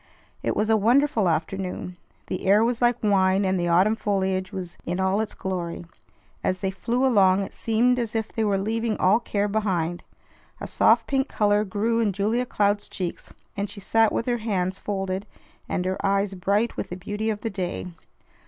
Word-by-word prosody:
It - - -1
was 210 - +1
a 220 - +5
wonderful 235 -1 +3
afternoon. 180 +2 -3 0.3
The 185 - -4
air 205 +3 +5
was 240 +1 0
like 240 -1 +2
wine, 195 -1 +3
and 190 -1 +1
the 175 - 0
autumn 185 +6 +4
foliage 190 -3 -1
was 180 -2 -6
in 175 +2 -3
all 190 +2 +2
its 220 - -5
glory. 175 -3 -4 0.6
As 185 0 -1
they 190 - 0
flew 235 +6 -1
along, 195 -6 +4
it - - -8
seemed 240 +3 +2
as 230 -2 -3
if 220 -1 -2
they 225 - 0
were 205 -2 +2
leaving 225 +2 -1
all 195 +5 +4
care 205 -3 -1
behind. 185 -5 -1 0.6
A - - -5
soft - - +3
pink 270 0 0
color 205 0 +2
grew 215 +3 0
in 215 -4 +1
Julia 220 +6 0
Cloud's 205 -1 0
cheeks, 180 -3 -5 0.2
and 200 0 -2
she 205 - -7
sat 225 +2 +3
with - - -1
her 240 -1 0
hands 190 -4 -1
folded 195 0 -3 0.4
and 180 - -1
her 185 0 -2
eyes 195 0 +1
bright 200 +5 0
with - - -4
the 180 - -5
beauty 205 +4 -3
of 210 -1 -2
the 225 - -3
day. 185 -3 -3
200 Hz, 190 wpm, -25 LUFS, 190-220 Hz, 0.6 s, a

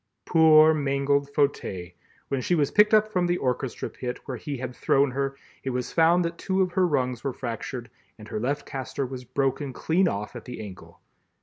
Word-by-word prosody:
Poor 160 -1 +6
mangled 140 -1 +1
Fauteuil! 140 - -1 0.4
When 135 -2 -1
she 175 - +1
was 145 -4 +1
picked 210 0 +5
up 215 0 +4
from 180 -2 +2
the 175 0 +1
orchestra 125 -2 -2
pit 125 -1 -5
where 130 -3 -5
he 140 +4 -5
had 125 0 -6
thrown 140 0 +2
her 135 +1 -2 0.3
it 135 - -2
was 125 -1 -3
found 170 +2 +4
that 170 0 -4
two 190 0 +1
of 180 - -2
her 185 0 +2
rungs 125 -6 -1
were 135 -2 -2
fractured 120 0 -5 0.3
and 105 - -12
her 105 - -4
left 140 +6 -2
castor 135 +1 -4
was 130 0 -7
broken 135 +2 -1
clean 180 +8 +1
off 105 -3 -3
at 120 - -8
the 125 - -7
ankle. 100 -4 -10
140 Hz, 200 wpm, -26 LUFS, 125-160 Hz, 0.4 s, Poor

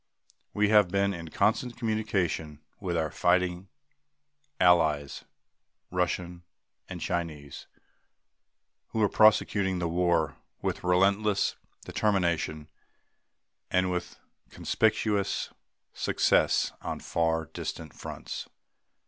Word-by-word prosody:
We 105 0 +2
have 105 -3 +6
been 100 +1 +1
in 85 -2 -7
constant 120 +7 0
communication 100 - -1 0.2
with 90 -4 -2
our 80 -1 -1
fighting 90 +1 +1 0.9
Allies, 80 -5 +3 0.7
Russian 90 -1 -2 0.5
and - - -6
Chinese, 80 -5 -4 1.2
who 110 - -1
are 105 - +4
prosecuting 100 -3 +4
the 85 -1 -1
war 85 -4 +1 0.2
with - - -3
relentless 100 +3 +2 0.3
determination 85 -7 0 1.0
and 90 0 +2
with 90 -1 -4 0.3
conspicuous 105 -2 0 0.4
success - - +2
on - - -4
far 80 -1 0
distant 80 -2 -6
fronts. - - -7
90 Hz, 90 wpm, -28 LUFS, 85-100 Hz, 1.2 s, have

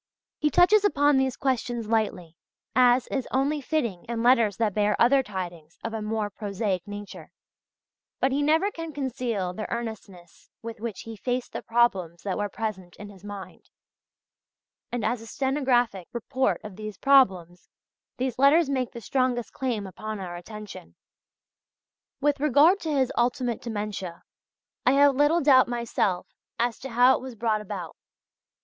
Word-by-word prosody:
He 300 - +2
touches 385 +7 +5
upon 290 -7 +3
these 265 -1 0
questions 240 -4 -1
lightly, 210 -7 -1 0.4
as 250 0 +5
is 265 -3 -2
only 280 +3 0
fitting 240 - -2
in 235 -1 -3
letters 235 -5 +4
that 220 -3 +1
bear 210 0 +1
other 270 +3 +5
tidings 175 -7 -7
of 225 - -4
a 220 - -3
more 210 -1 -2
prosaic 200 -2 -3
nature, 205 0 -8 0.9
but 265 - +2
he 280 +2 +1
never 320 +7 +2
can 330 -3 -7
conceal 245 -9 -2
the 215 +3 -6
earnestness 210 -7 -7
with 230 -1 -7
which 225 -3 -5
he 225 0 -8
faced 245 +3 -3
the - - -4
problems 195 -8 +1
that 195 -2 -2
were 205 0 -2
present 195 -5 -5
in 205 0 -10
his 190 -1 -17
mind, 205 -2 -9 1.2
and 240 -3 -2
as 225 +1 0
a 225 - -11
stenographic 245 - 0
report 235 -4 0
of 210 -3 -9
these 215 -2 -7
problems 190 -11 +3 0.5
these 255 -1 -2
letters 280 +2 +5
make 255 -3 -1
the 235 - -8
strongest 245 0 -1
claim 240 -6 -2
upon 215 +3 -6
our 180 -2 -6
attention. 185 - -10 1.2
With 290 0 +1
regard 300 +7 +5
to 320 -4 -3
his 265 -3 +1
ultimate 240 0 0
dementia, 205 -6 -5 0.6
I 255 - +4
have 280 0 +5
little 295 +5 +3
doubt 265 -3 +6
myself 235 -6 -1 0.3
as 235 -1 -1
to 270 - -7
how 245 +2 +5
it - - -10
was 260 -2 -8
brought 220 -1 0
about. 190 -5 -6
235 Hz, 155 wpm, -26 LUFS, 205-265 Hz, 1.2 s, doubt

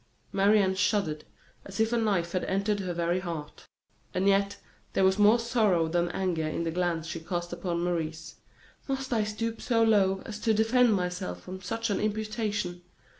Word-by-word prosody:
Marie 200 +2 +4
Anne 190 -1 +2
shuddered 185 -5 0 0.4
as 195 +2 -8
if 220 +1 +2
a - - +3
knife 195 -6 +1
had 185 - -1
entered 200 +2 0
her 185 -2 -3
very 170 +1 0
heart; 165 -5 -7 0.5
and 185 +2 +1
yet 200 0 +2 0.4
there 190 - +2
was 190 +2 +3
more 210 +3 +6
sorrow 220 -8 +2
than 175 +1 0
anger 175 -4 -1
in 155 - -2
the 165 - -1
glance 170 -2 -1
she 165 +1 -5
cast 175 +1 -4
upon 170 -1 -2
Maurice. 160 -2 -3 0.5
"Must 270 -2 -2
I 220 -2 +2
stoop 225 +2 -3
so 230 -2 +2
low 195 -4 +3
as 215 -1 -6
to 220 0 +2
defend 225 +1 +4
myself 180 - -3
from 185 +1 -8
such 225 +4 -2
an 200 - 0
imputation?" 215 -4 -2
190 Hz, 180 wpm, -28 LUFS, 175-215 Hz, 0.5 s, more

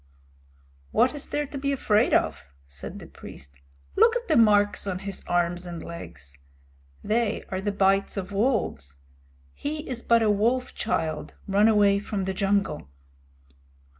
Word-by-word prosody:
"What 250 - +3
is 290 - -7
there 295 0 -1
to 280 0 -7
be 280 +1 0
afraid 215 -6 +2
of?" - - +1 0.2
said 70 0 -9
the - - -10
priest. 70 +1 -12 0.4
"Look 460 +2 +5
at 480 0 -3
the 315 - +2
marks 205 -4 +4
on 185 -2 -1
his 195 0 -6
arms 175 +1 0
and 170 -1 -6
legs. 75 - -10 0.6
They 220 0 0
are 190 0 -3
the 205 +1 -1
bites 195 0 +2
of 190 0 -4
wolves. 200 - -1 0.6
He 300 +1 -5
is 250 -3 -4
but 230 -1 +3
a 215 - +4
wolf 235 +5 +1
child 160 -7 -2
run 200 +2 +4
away 205 -2 +4
from 200 -1 -3
the 190 - -2
jungle." 195 - 0
205 Hz, 155 wpm, -26 LUFS, 175-235 Hz, 0.6 s, Look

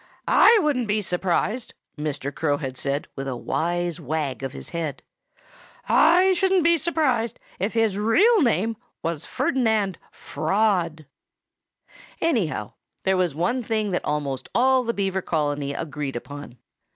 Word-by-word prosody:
"I 460 - +7
shouldn't 265 -6 +1
be 210 0 0
surprised 190 +6 -1
" - - -63
Mr. 145 -2 -4
Crow 145 -3 0
had 135 -3 -5
said 140 +2 -2
with 135 0 -5
a 130 - -2
wise 175 +6 -2
wag 145 -3 -2
of 135 -1 -4
his - - -9
head 165 -4 -4 0.8
"I 360 +4 +5
shouldn't 375 -1 +2
be 335 0 +4
surprised 265 -8 0 0.2
if 200 +5 -2
his 220 -3 +2
real 390 - +4
name 225 - +1 0.3
was 165 -2 -3
Ferdinand 220 -8 0
Fraud." 180 -7 0 1.1
Anyhow, 230 - 0 0.3
there 190 0 +2
was 180 -5 0
one 240 +11 0
thing 215 -3 -1
that 180 - -1
almost 140 -3 -3
all 260 +1 +4
the 235 -1 -2
Beaver 190 -1 -1
colony 145 -4 -1
agreed 145 -2 -4
upon. 140 0 -8
190 Hz, 140 wpm, -24 LUFS, 150-235 Hz, 1.1 s, I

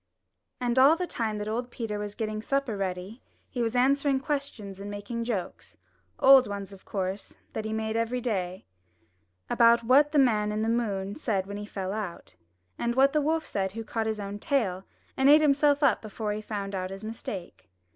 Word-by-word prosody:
And 245 0 +1
all 280 +5 +7
the 360 +2 -2
time 225 -9 -2
that 210 0 -4
old 240 +3 -2
Peter 225 -4 -4
was 205 0 -5
getting 215 -1 -3
supper 275 -2 -1
ready 195 +4 -4 0.3
he 250 - -2
was 230 +1 -1
answering 275 +2 +3
questions 265 -9 -4
and 200 +1 -6
making 205 +3 -4
jokes 205 -7 -4 0.2
— - - -41
old 265 -1 +8
ones, 200 -1 -6
of 190 - -15
course, 190 0 -4 0.2
that 220 - -4
he 220 - -3
made 220 0 -2
every 230 +2 0
day 190 -7 -3 0.4
— 90 +2 -43 0.2
about 235 0 +5
what 280 +5 +5
the 300 - +1
Man 215 -6 +3
in 215 +1 -1
the 225 - 0
Moon 205 -4 -1
said 205 -9 -1
when 200 +1 -6
he 205 0 -6
fell 190 -2 -4
out, 210 -5 -6 0.4
and 235 0 0
what 275 +2 +5
the 305 - +3
wolf 320 +2 0
said 190 -1 -2
who 225 +1 -5
caught 225 0 -2
his 220 -1 -2
own 200 0 -5
tail 205 - 0 0.3
and 265 +1 +4
ate 300 +1 +8
himself 290 0 +3
up 265 -6 +4
before 215 -1 -4
he 210 - -4
found 205 -2 -5
out 185 -1 -3
his 195 +2 -8
mistake. 200 - -7
220 Hz, 205 wpm, -28 LUFS, 200-255 Hz, 0.4 s, old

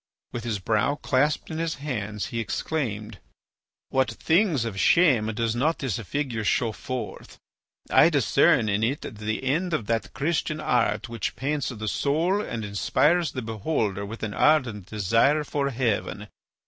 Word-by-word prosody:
With 120 0 -5
his 110 -3 -1
brow 110 +8 +1
clasped 145 +3 0
in 160 - -3
his 165 -1 -1
hands 110 -8 -4
he 115 - -1
exclaimed: 110 - -3 0.7
"What 130 -2 +2
things 160 - +1
of 100 -4 -4
shame 135 - +4
does 115 0 0
not 155 +7 +1
this 130 -8 -2
figure 120 0 -3
show 115 +3 +1
forth! 130 +3 -6 0.5
I - - +7
discern 110 - +3
in 100 0 +1
it 135 +6 0
the 110 +2 -4
end 160 +6 0
of 115 - -3
that 115 +1 -1
Christian 155 +1 -1
art 115 -3 +1
which 115 -1 -4
paints 145 +2 -1
the 110 -3 -5
soul 165 - +1
and 115 - -4
inspires 150 - +1
the 130 - -4
beholder 110 -2 -2
with 110 +3 -7
an 105 -1 -3
ardent 120 - +2
desire 115 +9 +2
for 140 -1 -1
heaven. 115 -4 -2
120 Hz, 155 wpm, -25 LUFS, 110-150 Hz, 0.7 s, I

